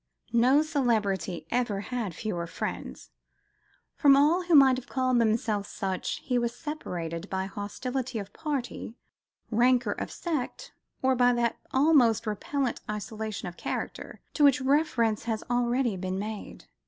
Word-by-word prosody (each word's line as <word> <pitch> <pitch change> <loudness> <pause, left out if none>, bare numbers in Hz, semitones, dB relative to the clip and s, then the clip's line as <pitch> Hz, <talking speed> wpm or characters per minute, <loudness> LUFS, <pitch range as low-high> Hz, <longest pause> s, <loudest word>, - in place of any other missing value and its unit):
No 255 +6 +5
celebrity 215 - 0
ever 235 -5 0
had 220 -6 -4
fewer 175 -7 -3
friends. - - -6 0.8
From 280 -3 +6
all 310 +6 +4
who 345 -2 +4
might 265 -3 +7
have 260 +1 -8
called 255 -2 +2
themselves 215 -2 0
such, 190 -3 -3
he 250 -2 +1
was 235 0 -2
separated 180 - -5
by 190 0 -1
hostility 245 +6 -4
of 205 -1 -6
party, 275 -6 -4 0.6
rancour 245 +2 +3
of - - -5
sect 340 - -4 0.3
or 260 0 +4
by 245 0 +4
that 235 -1 0
almost 260 -6 +4
repellent 245 +5 -2
isolation 215 -1 -4
of 175 - -8
character - - -5
to 300 - +1
which 280 -3 +6
reference 260 -6 +1
has 225 -2 -2
already 245 -1 +1
been 185 0 -3
made. 210 +1 -6
240 Hz, 140 wpm, -28 LUFS, 210-265 Hz, 0.8 s, might